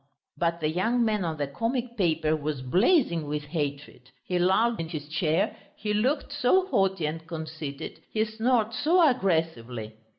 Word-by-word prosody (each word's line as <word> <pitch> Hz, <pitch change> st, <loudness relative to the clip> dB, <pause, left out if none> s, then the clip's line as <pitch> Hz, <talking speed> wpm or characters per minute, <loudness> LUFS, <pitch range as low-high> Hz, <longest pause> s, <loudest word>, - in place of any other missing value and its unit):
But 170 Hz, 0 st, -1 dB
the 155 Hz, -, +1 dB
young 225 Hz, +9 st, +1 dB
man 210 Hz, -3 st, +1 dB
on 160 Hz, -2 st, -2 dB
the 145 Hz, -, 0 dB
comic 235 Hz, -, -2 dB
paper 160 Hz, -6 st, +1 dB
was 150 Hz, -3 st, -3 dB
blazing 175 Hz, -, +3 dB
with 150 Hz, 0 st, -2 dB
hatred, 145 Hz, -4 st, -4 dB, 0.2 s
he 180 Hz, -1 st, 0 dB
lolled 220 Hz, +6 st, +3 dB
in 165 Hz, -1 st, -3 dB
his 150 Hz, -3 st, -5 dB
chair, 160 Hz, +2 st, 0 dB, 0.2 s
he 210 Hz, 0 st, -2 dB
looked 265 Hz, +7 st, 0 dB
so 295 Hz, +7 st, +3 dB
haughty 190 Hz, -, +1 dB
and 160 Hz, +2 st, -4 dB
conceited, 155 Hz, -3 st, -6 dB
he 220 Hz, 0 st, +1 dB
snorted 225 Hz, +1 st, +1 dB
so 335 Hz, +6 st, +4 dB
aggressively! 160 Hz, -, -1 dB
170 Hz, 160 wpm, -27 LUFS, 155-230 Hz, 0.2 s, so